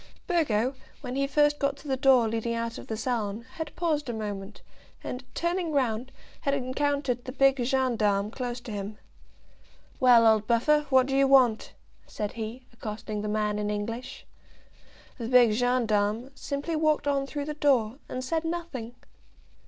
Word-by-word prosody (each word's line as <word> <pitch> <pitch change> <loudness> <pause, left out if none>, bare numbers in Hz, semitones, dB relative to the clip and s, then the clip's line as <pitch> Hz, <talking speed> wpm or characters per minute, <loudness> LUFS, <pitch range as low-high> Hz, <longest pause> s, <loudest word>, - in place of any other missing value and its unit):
Burgo, 265 - +1 0.3
when 250 -2 -5
he 275 0 +1
first 295 +1 +3
got 280 -1 0
to 295 - -13
the 265 - +1
door 260 -3 +4
leading 230 +1 -2
out 230 0 -3
of - - -11
the 220 - -3
salon, 225 -2 -2
had 320 -2 -5
paused 305 -5 -1
a - - -2
moment, 205 -2 -6 0.4
and, 250 +1 -5
turning 345 -1 -1
round, 255 -3 0 0.3
had 280 0 0
encountered 270 -1 -1
the 255 - -5
big 270 -1 +3
gendarme 225 -6 +1
close 245 -1 -4
to 235 - -8
him. 205 +1 -5 1.0
"Well, 245 -2 +6
old 220 -1 +4
Buffer, 295 +6 +3
what 260 -2 +5
do 270 0 -2
you 275 0 +4
want?" 255 -5 +4 0.3
said 210 -1 -4
he, 230 +3 -6
accosting 215 -2 -5
the 210 - -3
man 210 0 0
in 210 0 -1
English. 225 +4 -5 0.9
The 230 - -3
big 245 -2 +6
gendarme 230 0 +1
simply 280 +4 -3
walked 310 -2 +1
on 275 -1 +1
through 290 0 -4
the 300 - -3
door, 265 -5 +2
and 255 - -4
said 320 +4 -1
nothing. 325 -9 -5
250 Hz, 165 wpm, -27 LUFS, 220-280 Hz, 1.0 s, Well